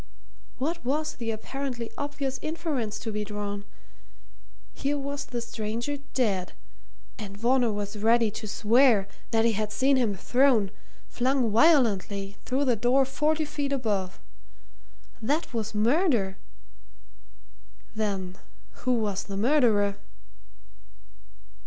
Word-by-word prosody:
what 330 Hz, +6 st, -2 dB
was 305 Hz, +5 st, -1 dB
the 230 Hz, -2 st, -4 dB
apparently 240 Hz, +1 st, -4 dB
obvious 280 Hz, -2 st, -3 dB
inference 310 Hz, -9 st, -2 dB
to 225 Hz, -, -5 dB
be 210 Hz, 0 st, -2 dB
drawn? 205 Hz, -1 st, -4 dB, 1.1 s
Here 285 Hz, +1 st, -1 dB
was 280 Hz, 0 st, -4 dB
the 240 Hz, -1 st, -3 dB
stranger 230 Hz, +5 st, -3 dB, 0.2 s
dead 195 Hz, -8 st, 0 dB, 0.7 s
and 200 Hz, -2 st, -7 dB
Varner 240 Hz, +1 st, +3 dB
was 205 Hz, 0 st, -4 dB
ready 225 Hz, +1 st, +3 dB
to 215 Hz, +1 st, -6 dB
swear 225 Hz, -1 st, +4 dB, 0.2 s
that 225 Hz, -1 st, +2 dB
he 230 Hz, -, +4 dB
had 215 Hz, 0 st, -2 dB
seen 270 Hz, +3 st, +3 dB
him 225 Hz, -6 st, +1 dB
thrown, 240 Hz, -1 st, +3 dB, 0.4 s
flung 250 Hz, -2 st, +1 dB
violently, 205 Hz, -, +3 dB
through 270 Hz, +3 st, 0 dB
the 250 Hz, -3 st, +3 dB
door 245 Hz, +5 st, +3 dB
forty 305 Hz, +4 st, 0 dB
feet 290 Hz, -1 st, -3 dB
above. 210 Hz, -9 st, -1 dB, 1.0 s
That 290 Hz, +6 st, -1 dB
was 220 Hz, -2 st, -3 dB
murder! 230 Hz, -, +2 dB, 1.6 s
Then 195 Hz, -4 st, -2 dB, 0.5 s
who 255 Hz, -1 st, +3 dB
was 205 Hz, -4 st, -1 dB
the 200 Hz, -1 st, -5 dB
murderer? 215 Hz, -5 st, +3 dB
235 Hz, 115 wpm, -27 LUFS, 210-275 Hz, 1.6 s, swear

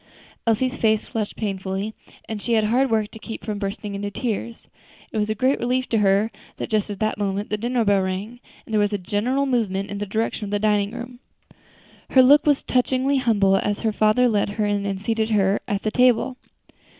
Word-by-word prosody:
Elsie's 255 Hz, +4 st, +1 dB
face 220 Hz, -1 st, +2 dB
flushed 215 Hz, -2 st, -4 dB
painfully, 195 Hz, 0 st, -3 dB, 0.3 s
and 215 Hz, -2 st, -5 dB
she 235 Hz, -, -1 dB
had 220 Hz, -1 st, +3 dB
hard 250 Hz, +5 st, +2 dB
work 220 Hz, -2 st, 0 dB
to 220 Hz, -, -11 dB
keep 225 Hz, 0 st, -8 dB
from 210 Hz, -2 st, -3 dB
bursting 200 Hz, +1 st, -4 dB
into 200 Hz, +1 st, -3 dB
tears. 230 Hz, +1 st, -4 dB, 0.4 s
It 220 Hz, -, -2 dB
was 210 Hz, 0 st, 0 dB
a 215 Hz, -, 0 dB
great 260 Hz, +5 st, +1 dB
relief 255 Hz, +2 st, 0 dB
to 225 Hz, -, +2 dB
her 205 Hz, +2 st, +3 dB, 0.3 s
that -, -, -5 dB
just 215 Hz, -2 st, +1 dB
at 205 Hz, -, -5 dB
that 215 Hz, -1 st, 0 dB
moment 200 Hz, +1 st, -2 dB
the 210 Hz, -, 0 dB
dinner 240 Hz, +1 st, 0 dB
bell 200 Hz, -1 st, +3 dB
rang, 190 Hz, +6 st, -4 dB, 0.3 s
and 225 Hz, -, -9 dB
there 215 Hz, -, +3 dB
was 205 Hz, 0 st, +1 dB
a -, -, +1 dB
general 210 Hz, +9 st, 0 dB
movement 205 Hz, -7 st, -1 dB
in 205 Hz, -, -4 dB
the 205 Hz, -, -3 dB
direction 220 Hz, +1 st, -2 dB
of -, -, -6 dB
the 205 Hz, -, 0 dB
dining 205 Hz, -1 st, +1 dB
room. 245 Hz, +1 st, -8 dB, 0.9 s
Her 260 Hz, -, +6 dB
look 290 Hz, +3 st, +6 dB
was 290 Hz, -2 st, +3 dB
touchingly 260 Hz, +2 st, +1 dB
humble 205 Hz, -6 st, +3 dB
as 205 Hz, +1 st, -1 dB
her 220 Hz, -, +1 dB
father 215 Hz, +4 st, +3 dB
led 210 Hz, -3 st, +1 dB
her 215 Hz, -, +1 dB
in 205 Hz, -1 st, 0 dB
and 195 Hz, -1 st, -2 dB
seated 220 Hz, +2 st, -1 dB
her 200 Hz, -2 st, +2 dB
at 205 Hz, -1 st, -2 dB
the 215 Hz, -, 0 dB
table. 250 Hz, +1 st, +3 dB
215 Hz, 215 wpm, -23 LUFS, 205-240 Hz, 0.9 s, Her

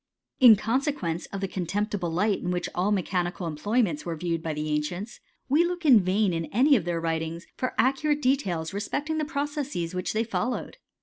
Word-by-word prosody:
In 245 Hz, -5 st, +9 dB
consequence 225 Hz, -, -1 dB
of 195 Hz, -, -6 dB
the 195 Hz, -, -1 dB
contemptible 190 Hz, +1 st, -2 dB
light 195 Hz, +5 st, +1 dB
in 180 Hz, 0 st, -1 dB
all 185 Hz, +4 st, 0 dB
mechanical 180 Hz, -2 st, -1 dB
employments 170 Hz, +2 st, 0 dB
were 170 Hz, -1 st, -3 dB
viewed 165 Hz, 0 st, -2 dB
by 160 Hz, -, -3 dB
th#i 150 Hz, 0 st, -1 dB
cients, 180 Hz, +9 st, -6 dB, 0.3 s
we 295 Hz, +5 st, +4 dB
look 350 Hz, -1 st, -3 dB
in 255 Hz, -7 st, +8 dB
vain 190 Hz, +1 st, +1 dB
in 165 Hz, -1 st, -3 dB
ai^ 270 Hz, +7 st, +4 dB
of 200 Hz, -9 st, 0 dB
their 170 Hz, -1 st, -1 dB
writin 165 Hz, 0 st, -2 dB, 0.4 s
accurate 275 Hz, +6 st, +2 dB
details 190 Hz, -, 0 dB
respecting 290 Hz, +10 st, -2 dB
the 305 Hz, -, 0 dB
processes 285 Hz, -, -3 dB
which 180 Hz, +2 st, -3 dB
1 225 Hz, +2 st, +1 dB
followed. 245 Hz, -, -3 dB
195 Hz, 175 wpm, -26 LUFS, 170-255 Hz, 0.4 s, In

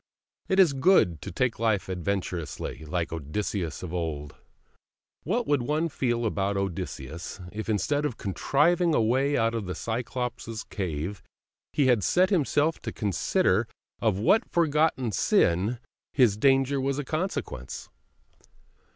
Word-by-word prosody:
It 190 Hz, -, +2 dB
is 175 Hz, -7 st, +6 dB
good 135 Hz, -, +3 dB
to -, -, -6 dB
take 125 Hz, +5 st, 0 dB
life 110 Hz, -4 st, +1 dB
adventurously, 90 Hz, -4 st, -3 dB
like 85 Hz, +1 st, -2 dB
Odysseus 80 Hz, +3 st, -3 dB
of 90 Hz, -1 st, -6 dB
old. 80 Hz, -4 st, -3 dB, 0.9 s
What 230 Hz, +8 st, -1 dB
would 145 Hz, -3 st, +2 dB
one 155 Hz, +6 st, 0 dB
feel 120 Hz, -4 st, -1 dB
about 100 Hz, -2 st, 0 dB
Odysseus 85 Hz, -3 st, -4 dB
if, 110 Hz, +1 st, -5 dB
instead 145 Hz, +8 st, +1 dB
of 140 Hz, -6 st, -2 dB
contriving 155 Hz, -, +2 dB
a -, -, +4 dB
way 130 Hz, +6 st, +2 dB
out 115 Hz, 0 st, +2 dB
of 110 Hz, -5 st, -3 dB
the 90 Hz, -, -3 dB
Cyclops' 115 Hz, -1 st, -4 dB
cave, 90 Hz, 0 st, -4 dB, 0.5 s
he 145 Hz, -, +2 dB
had 120 Hz, -6 st, +3 dB
set 185 Hz, -, +3 dB
himself 155 Hz, -2 st, +2 dB
to -, -, -4 dB
consider 105 Hz, -, +1 dB, 0.3 s
of 110 Hz, -5 st, +2 dB
what 200 Hz, -, +3 dB
forgotten 150 Hz, -7 st, +2 dB
sin 95 Hz, +4 st, +2 dB, 0.3 s
his 125 Hz, -7 st, +4 dB
danger 135 Hz, +3 st, +3 dB
was 135 Hz, +1 st, 0 dB
the 145 Hz, -, -2 dB
consequence? 155 Hz, -, -4 dB
115 Hz, 135 wpm, -27 LUFS, 95-145 Hz, 0.9 s, is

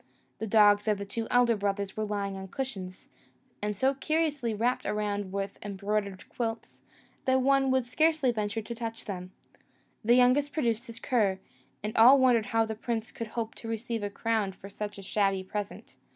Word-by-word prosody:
The 220 Hz, -, -3 dB
dogs 205 Hz, 0 st, +5 dB
of 210 Hz, -1 st, +2 dB
the 200 Hz, -, -5 dB
two 225 Hz, +3 st, -4 dB
elder 245 Hz, -1 st, +4 dB
brothers 200 Hz, -1 st, -2 dB
were 215 Hz, -, -1 dB
lying 200 Hz, -2 st, -2 dB
on 190 Hz, 0 st, -7 dB
cushions, 195 Hz, -6 st, -6 dB, 0.5 s
and 210 Hz, 0 st, -1 dB
so 265 Hz, +5 st, +3 dB
curiously 295 Hz, -3 st, 0 dB
wrapped 235 Hz, +4 st, 0 dB
around 205 Hz, -2 st, -2 dB
with 195 Hz, 0 st, -4 dB
embroidered 200 Hz, -1 st, -3 dB
quilts, 225 Hz, -1 st, -5 dB, 0.4 s
that 260 Hz, 0 st, +3 dB
one 275 Hz, 0 st, +3 dB
would 260 Hz, -2 st, +2 dB
scarcely 310 Hz, +1 st, +2 dB
venture 215 Hz, -1 st, -2 dB
to 235 Hz, -, -6 dB
touch 230 Hz, -1 st, -5 dB
them. 185 Hz, -2 st, -6 dB, 0.7 s
The 235 Hz, +3 st, +5 dB
youngest 255 Hz, +4 st, +4 dB
produced 240 Hz, -4 st, 0 dB
his 230 Hz, -1 st, -8 dB
cur, 210 Hz, -7 st, +1 dB, 0.5 s
and 210 Hz, +1 st, -3 dB
all 245 Hz, +5 st, +8 dB
wondered 245 Hz, -4 st, +4 dB
how 225 Hz, 0 st, +2 dB
the 220 Hz, -, -4 dB
prince 225 Hz, +1 st, -3 dB
could 230 Hz, -, -5 dB
hope 225 Hz, 0 st, -4 dB
to 230 Hz, -, -10 dB
receive 225 Hz, 0 st, -3 dB
a 205 Hz, -, -2 dB
crown 215 Hz, -2 st, -1 dB
for 195 Hz, +1 st, -11 dB
such 205 Hz, +1 st, -6 dB
a 195 Hz, -, -9 dB
shabby 195 Hz, -1 st, +1 dB
present. 205 Hz, +1 st, -6 dB
220 Hz, 180 wpm, -29 LUFS, 205-245 Hz, 0.7 s, all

